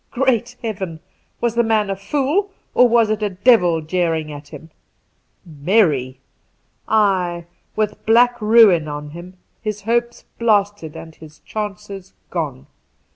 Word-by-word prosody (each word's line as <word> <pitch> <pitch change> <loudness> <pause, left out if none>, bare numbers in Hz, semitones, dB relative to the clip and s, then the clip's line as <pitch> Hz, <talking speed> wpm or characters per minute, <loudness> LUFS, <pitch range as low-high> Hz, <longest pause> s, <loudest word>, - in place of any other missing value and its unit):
Great 245 -2 0
Heaven 195 -7 -4
I 160 - -24
was 235 -2 0
the 235 - +2
man 220 -3 +1
a - - -2
fool, 290 - -1 0.2
or 250 - +5
was 230 -2 +3
it 215 0 -1
a 210 - 0
devil 180 -4 +3
jeering 160 -2 -1
at 145 0 -10
him? 160 +2 -12 0.7
Merry! 150 - +1 0.7
Ay, 185 -5 +1 0.3
with 210 -1 -2
black 240 +1 +4
ruin 210 -7 +5
on 150 0 -6
him, 175 +3 -11 0.2
his 215 -2 -4
hopes 235 +2 -1
blasted 205 -7 0
and 160 0 -10
his 155 -1 -15
chances 200 -2 -7 0.2
gone. 65 - -4
200 Hz, 135 wpm, -19 LUFS, 165-230 Hz, 0.7 s, or